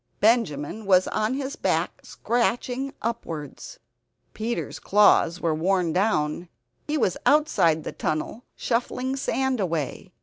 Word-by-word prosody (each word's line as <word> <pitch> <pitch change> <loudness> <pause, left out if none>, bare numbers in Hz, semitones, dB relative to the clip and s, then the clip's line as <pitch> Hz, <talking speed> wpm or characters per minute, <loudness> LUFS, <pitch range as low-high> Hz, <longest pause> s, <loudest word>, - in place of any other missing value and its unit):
Benjamin 210 - +1
was 185 -1 +5
on 215 +4 0
his 275 0 -4
back - - -1
scratching 245 +3 -1
upwards. 165 - -5 0.6
Peter's 225 +2 -3
claws 200 -4 +4
were 165 -2 0
worn 175 +1 +1
down; 175 -4 0 0.4
he 300 +1 0
was 190 - +1
outside 280 - +3
the - - -5
tunnel, 155 +10 -3
shuffling 250 +2 -1
sand 265 -1 -1
away. 165 -7 -3
215 Hz, 115 wpm, -25 LUFS, 165-245 Hz, 0.6 s, was